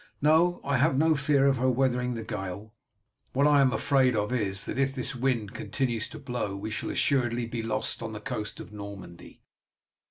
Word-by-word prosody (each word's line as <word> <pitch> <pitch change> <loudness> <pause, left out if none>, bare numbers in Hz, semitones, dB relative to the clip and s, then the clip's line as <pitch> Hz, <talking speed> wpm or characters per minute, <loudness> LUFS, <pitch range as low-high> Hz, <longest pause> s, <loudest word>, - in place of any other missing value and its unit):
No, 160 +4 +3
I 140 -1 +1
have 140 +1 +3
no 160 +2 +4
fear 140 -1 +2
of 135 -1 +3
her 130 +1 +2
weathering 125 -1 +1
the 115 - -5
gale. 100 +1 -6 0.6
What 140 +2 +3
I 145 -1 +5
am 130 -2 +4
afraid 130 -3 +2
of 105 +3 0
is, 100 -4 -1
that - - -4
if 135 0 +1
this 130 - -2
wind 120 -5 -1
continues 115 +2 -2
to 155 - -10
blow 125 -8 -3
we 100 +3 -5
shall - - -3
assuredly 120 -4 +1
be 115 0 -4
lost 110 +1 -1
on 115 -1 -4
the 105 - -6
coast 105 0 -5
of 105 - -10
Normandy." 100 -4 -10
125 Hz, 195 wpm, -28 LUFS, 110-135 Hz, 0.6 s, I